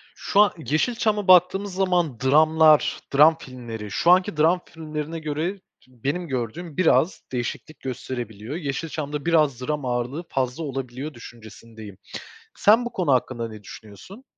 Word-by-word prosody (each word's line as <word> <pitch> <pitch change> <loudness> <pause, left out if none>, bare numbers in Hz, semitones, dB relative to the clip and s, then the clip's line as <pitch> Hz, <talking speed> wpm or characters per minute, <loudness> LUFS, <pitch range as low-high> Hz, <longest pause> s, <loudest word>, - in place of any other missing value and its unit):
Şu 200 - -1
a 205 -3 +4
Yeşilçam'a 210 - 0
baktığımız 185 +2 +4
zaman 180 -9 0
dramlar, 155 +3 +4 0.2
dram 155 +3 +6
filmleri, 115 -6 -8
şu 170 - +3
anki 180 -4 +3
dram 170 +4 +3
filmlerine 155 0 -6
göre 160 +6 -3
t - - -40 0.3
benim 140 +8 -4
gördüğüm 130 +5 -5
biraz 185 0 +2
değişiklik 125 +5 -5
gösterebiliyor. 120 -1 -6
Yeşilçam'da 150 -1 -4
biraz 150 -7 +2
dram 150 0 -3
ağırlığı 125 +6 -2
fazla 130 +4 -2
olabiliyor 135 +1 -5
düşüncesindeyim. 110 -3 -12 0.6
Sen 225 +4 +5
bu 240 - -5
konu 175 -7 0
hakkında 120 -2 0
ne 110 -1 -11
düşünüyorsun? 115 - -13
150 Hz, 135 wpm, -23 LUFS, 125-170 Hz, 0.6 s, dram